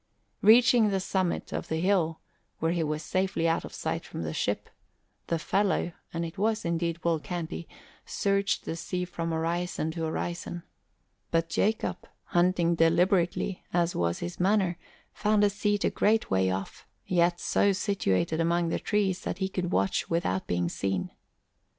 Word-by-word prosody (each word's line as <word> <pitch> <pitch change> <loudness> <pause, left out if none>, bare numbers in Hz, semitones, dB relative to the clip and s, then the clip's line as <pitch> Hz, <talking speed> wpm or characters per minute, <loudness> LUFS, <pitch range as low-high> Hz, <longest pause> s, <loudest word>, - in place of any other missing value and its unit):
Reaching 235 +1 +6
the 195 -1 +1
summit, 185 -1 -1
of - - -3
the 160 - -1
hill, 170 -3 +1 0.4
where 160 +1 0
he 170 -1 0
was 155 0 -2
safely 185 -2 0
out 165 0 +1
of - - -8
sight - - -3
from - - -6
the 80 0 -3
ship, - - -1 0.6
the 165 - +1
fellow 195 +1 +1 0.2
and 170 0 -2
it 165 +3 -8
was 220 0 +1
indeed 170 0 0
Will 165 -2 +2
Canty 170 0 -5 0.4
searched 200 0 0
the - - -3
sea 180 +2 -3
from 170 -2 -4
horizon 165 0 -1
to 165 0 -5
horizon; 170 +1 -4 0.7
but 165 0 +1
Jacob, 195 -2 0 0.2
hunting 175 -1 +2
deliberately 175 +3 +2
as 175 0 +1
was 85 0 0
his 175 0 -6
manner, 190 -1 +2 0.4
found 210 0 +2
a 205 - +4
seat 205 0 0
a - - +2
great 220 +2 +2
way 95 0 +3
off, 95 +1 -5 0.2
yet 175 -1 +2
so 200 - +2
situated 170 - 0
among 170 0 +2
the - - -1
trees 200 -3 0
that - - -3
he 190 -1 0
could 185 -2 -3
watch 95 0 +1
without 165 - 0
being 90 0 0
seen. 95 0 -2
175 Hz, 165 wpm, -28 LUFS, 165-195 Hz, 0.7 s, Reaching